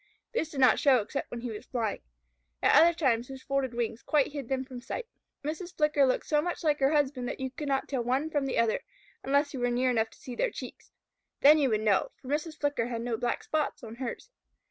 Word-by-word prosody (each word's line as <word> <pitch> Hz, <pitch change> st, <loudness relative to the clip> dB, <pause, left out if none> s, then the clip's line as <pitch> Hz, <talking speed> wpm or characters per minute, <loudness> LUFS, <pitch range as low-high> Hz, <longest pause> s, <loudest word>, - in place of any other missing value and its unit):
These 325 Hz, -9 st, -1 dB
did 285 Hz, -, -6 dB
not 255 Hz, -, +6 dB
show 275 Hz, -4 st, +5 dB
except 245 Hz, +5 st, -3 dB
when 240 Hz, -, -6 dB
he 245 Hz, -1 st, -4 dB
was 210 Hz, -, -8 dB
flying. 230 Hz, -5 st, -2 dB, 0.6 s
At -, -, +5 dB
other 335 Hz, +1 st, +8 dB
times 250 Hz, -7 st, +1 dB
his 265 Hz, -1 st, -9 dB
folded 275 Hz, -3 st, -1 dB
wings 235 Hz, -1 st, -2 dB
quite 295 Hz, -3 st, +2 dB
hid 280 Hz, -5 st, -6 dB
them 265 Hz, -1 st, -1 dB
from 255 Hz, -2 st, -9 dB
sight. 460 Hz, -, -5 dB, 0.4 s
Mrs. 335 Hz, +4 st, -5 dB
Flicker 300 Hz, -3 st, +4 dB
looked 255 Hz, -, 0 dB
so 300 Hz, -1 st, +2 dB
much 350 Hz, +2 st, -3 dB
like 300 Hz, -2 st, +2 dB
her 270 Hz, +1 st, +3 dB
husband 275 Hz, -4 st, +1 dB
that -, -, -5 dB
you 265 Hz, -1 st, -3 dB
could 290 Hz, +3 st, -6 dB
not 270 Hz, -1 st, 0 dB
tell 260 Hz, -4 st, -1 dB
one 265 Hz, +6 st, 0 dB
from 290 Hz, -3 st, 0 dB
the 265 Hz, -, -2 dB
other, 230 Hz, -1 st, +2 dB, 0.4 s
unless 285 Hz, +2 st, +1 dB
you 265 Hz, -, -4 dB
were 245 Hz, 0 st, +1 dB
near 250 Hz, +1 st, +2 dB
enough 225 Hz, -2 st, +1 dB
to -, -, -19 dB
see 250 Hz, -, -8 dB
their -, -, 0 dB
cheeks. -, -, -9 dB, 0.5 s
Then 300 Hz, +2 st, +8 dB
you 275 Hz, -3 st, +3 dB
would 215 Hz, -2 st, +1 dB
know, 210 Hz, -3 st, +2 dB
for 260 Hz, -, -11 dB
Mrs. 305 Hz, +2 st, -2 dB
Flicker 285 Hz, -5 st, 0 dB
had 235 Hz, -1 st, -3 dB
no 240 Hz, -1 st, -1 dB
black 240 Hz, +1 st, -2 dB
spots 305 Hz, -4 st, -2 dB
on 225 Hz, 0 st, -8 dB
hers. 260 Hz, -, -6 dB
265 Hz, 240 wpm, -29 LUFS, 245-295 Hz, 0.6 s, other